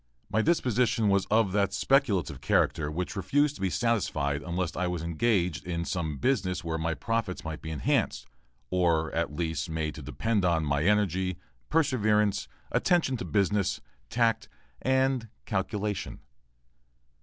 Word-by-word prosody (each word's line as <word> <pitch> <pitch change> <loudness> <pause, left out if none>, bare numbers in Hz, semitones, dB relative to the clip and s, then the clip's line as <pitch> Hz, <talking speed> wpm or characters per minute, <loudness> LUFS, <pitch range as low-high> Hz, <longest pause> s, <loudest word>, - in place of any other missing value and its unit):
My 110 - +3
disposition 120 -7 +2
was 100 -1 +2
of 110 -2 +3
that 100 0 +1
speculative 130 - +1
character 75 -1 +1
which 90 +6 -3
refused 140 - +2
to 100 - -12
be 95 - +1
satisfied 80 -11 0
unless 90 +2 -2
I 90 +1 0
was 90 -2 -3
engaged 85 - 0
in 85 -1 -2
some 80 -6 -2
business 95 - 0
where 80 -1 -2
my 80 0 -1
profits 100 - -2
might 80 -1 -5
be 80 - -6
enhanced, 70 -4 0 0.5
or, 85 -3 +2
at 80 -3 -1
least, 80 +1 -2
made 80 -1 -2
to - - -9
depend 110 -3 -1
upon 85 -3 +2
my 70 0 +1
energy, 95 -3 +1 0.3
perseverance, 110 -9 +2 0.2
attention 170 -7 +2
to 120 - -5
business, 100 -1 +1 0.3
tact, 115 -2 +1 0.3
and 130 -3 +1 0.2
"calculation." 105 -4 -2
95 Hz, 145 wpm, -28 LUFS, 85-115 Hz, 0.5 s, My